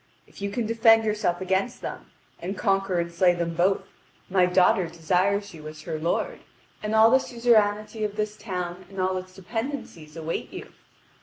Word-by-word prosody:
If -, -, -16 dB
you 200 Hz, -, -1 dB
can 225 Hz, +3 st, -2 dB
defend 225 Hz, 0 st, +5 dB
yourself 210 Hz, -5 st, 0 dB
against 190 Hz, +6 st, -1 dB
them, -, -, -6 dB, 0.3 s
and 190 Hz, +3 st, -5 dB
conquer 195 Hz, -3 st, +1 dB
and 170 Hz, 0 st, -2 dB
slay 175 Hz, 0 st, +4 dB
them 170 Hz, -1 st, -2 dB
both, 185 Hz, +4 st, +2 dB, 0.5 s
my 185 Hz, -1 st, +4 dB
daughter 180 Hz, 0 st, +4 dB
desires 185 Hz, +5 st, 0 dB
you 155 Hz, -2 st, -10 dB
as 155 Hz, 0 st, -10 dB
her 160 Hz, -2 st, -4 dB
lord, 170 Hz, +3 st, -1 dB, 0.4 s
and 215 Hz, +1 st, -1 dB
the 225 Hz, +4 st, +7 dB
suzerainty 220 Hz, -3 st, +1 dB
of 210 Hz, -1 st, -2 dB
this 210 Hz, 0 st, -2 dB
town 180 Hz, -3 st, -5 dB
and 195 Hz, -1 st, -8 dB
all 185 Hz, 0 st, +1 dB
its 185 Hz, 0 st, -8 dB
dependencies 195 Hz, -, -6 dB
awaits 165 Hz, 0 st, -4 dB
you." -, -, -8 dB
190 Hz, 170 wpm, -26 LUFS, 175-215 Hz, 0.5 s, the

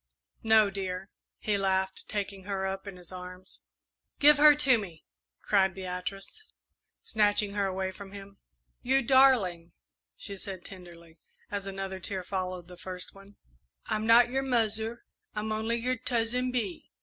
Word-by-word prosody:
"No, 220 Hz, -2 st, +5 dB
dear," 190 Hz, 0 st, -4 dB, 0.3 s
he 205 Hz, -2 st, -1 dB
laughed, 190 Hz, 0 st, 0 dB
taking 200 Hz, -2 st, -4 dB
her 195 Hz, -1 st, -2 dB
up 195 Hz, +1 st, -4 dB
in 195 Hz, -2 st, -7 dB
his 180 Hz, -1 st, -10 dB
arms. 180 Hz, 0 st, -10 dB, 0.6 s
"Give 295 Hz, +1 st, +7 dB
her 300 Hz, 0 st, +8 dB
to 270 Hz, -5 st, +4 dB
me!" 175 Hz, -6 st, -9 dB, 0.4 s
cried 190 Hz, -2 st, +2 dB
Beatrice, 195 Hz, -, -6 dB, 0.5 s
snatching 205 Hz, -1 st, +2 dB
her 200 Hz, -1 st, 0 dB
away 190 Hz, 0 st, -2 dB
from 195 Hz, +1 st, -11 dB
him. 200 Hz, 0 st, -11 dB, 0.4 s
"You 265 Hz, +2 st, +2 dB
darling," 220 Hz, -11 st, +4 dB, 0.4 s
she 200 Hz, -, -6 dB
said 190 Hz, -2 st, -7 dB
tenderly, 170 Hz, -3 st, -13 dB, 0.3 s
as 200 Hz, -1 st, -3 dB
another 195 Hz, -1 st, -5 dB
tear 185 Hz, 0 st, -3 dB
followed 185 Hz, -1 st, -4 dB
the 180 Hz, 0 st, -12 dB
first 180 Hz, 0 st, -5 dB
one; 195 Hz, +1 st, -16 dB, 0.5 s
"I'm 215 Hz, +1 st, -1 dB
not 235 Hz, +1 st, +7 dB
your 265 Hz, +1 st, +1 dB
'muzzer,' 225 Hz, -3 st, 0 dB, 0.3 s
I'm 215 Hz, +1 st, -2 dB
only 220 Hz, +2 st, 0 dB
your 250 Hz, +2 st, -1 dB
'Tuzzin 250 Hz, +1 st, 0 dB
Bee.'" 215 Hz, -8 st, -3 dB
200 Hz, 150 wpm, -29 LUFS, 185-225 Hz, 0.6 s, her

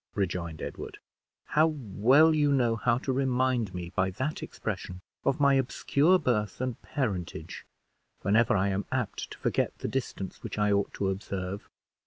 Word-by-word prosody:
rejoined 85 Hz, -5 st, -2 dB
Edward; -, -, -6 dB, 0.5 s
"how 155 Hz, +2 st, +4 dB
well 140 Hz, +2 st, +4 dB
you 145 Hz, -2 st, +3 dB
know 120 Hz, -4 st, +3 dB
how 120 Hz, +1 st, +2 dB
to 130 Hz, +1 st, -2 dB
remind 130 Hz, -4 st, +1 dB
me, 90 Hz, -1 st, -5 dB
by 95 Hz, -, +2 dB
that 130 Hz, +11 st, -3 dB
expression, 95 Hz, -3 st, -5 dB, 0.2 s
of 135 Hz, +1 st, +1 dB
my 140 Hz, -1 st, +5 dB
obscure 140 Hz, +6 st, +3 dB
birth 120 Hz, -, 0 dB
and 130 Hz, -2 st, -3 dB
parentage, 100 Hz, -, -4 dB, 0.6 s
whenever 105 Hz, +2 st, +4 dB
I 100 Hz, +1 st, +2 dB
am 100 Hz, +1 st, -1 dB
apt 125 Hz, -5 st, -2 dB
to -, -, -9 dB
forget -, -, 0 dB
the -, -, -4 dB
distance 120 Hz, -7 st, -4 dB
which -, -, -6 dB
I 105 Hz, 0 st, +2 dB
ought 100 Hz, 0 st, +1 dB
to 100 Hz, -, 0 dB
observe!" 95 Hz, 0 st, -4 dB
115 Hz, 160 wpm, -29 LUFS, 95-135 Hz, 0.6 s, my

